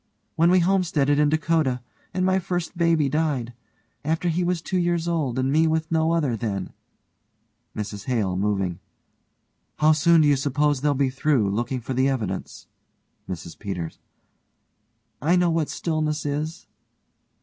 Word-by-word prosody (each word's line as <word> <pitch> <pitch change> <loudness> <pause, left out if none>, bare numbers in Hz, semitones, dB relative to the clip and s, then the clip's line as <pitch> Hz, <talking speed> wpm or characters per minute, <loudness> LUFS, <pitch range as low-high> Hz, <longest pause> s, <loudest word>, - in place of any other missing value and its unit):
When 165 +2 +4
we 180 0 +5
homesteaded 170 -6 +2
in 150 -1 +4
Dakota, 155 -4 +1 0.3
and 185 0 0
my 190 0 +3
first 175 -1 -3
baby 165 -4 +2
died 140 -5 -1 0.5
after 160 +3 0
he 170 +2 0
was 175 0 0
two 185 +3 -2
years 170 -1 0
old, 150 -7 -1
and 130 +1 +1
me 160 +2 +4
with 160 0 -1
no 160 0 +2
other 145 -8 +1
then 100 -4 -4 1.0
MRS 105 -1 -5
HALE: 105 -8 0
(moving) 95 -2 -1 1.0
How 155 +1 +5
soon 160 +2 +5
do 150 - +4
you 145 -1 +4
suppose 145 0 +1
they'll 145 -1 +2
be 135 -1 +1
through, 130 -6 +1
looking 120 +4 -2
for 130 - -4
the 130 +2 +2
evidence? 105 -8 -4 0.6
MRS 85 -2 -7
PETERS: 90 -5 -5 1.2
I 165 +6 +3
know 175 -1 +3
what 160 -2 0
stillness 155 -2 -2
is. 155 +4 -3
150 Hz, 150 wpm, -24 LUFS, 125-165 Hz, 1.2 s, we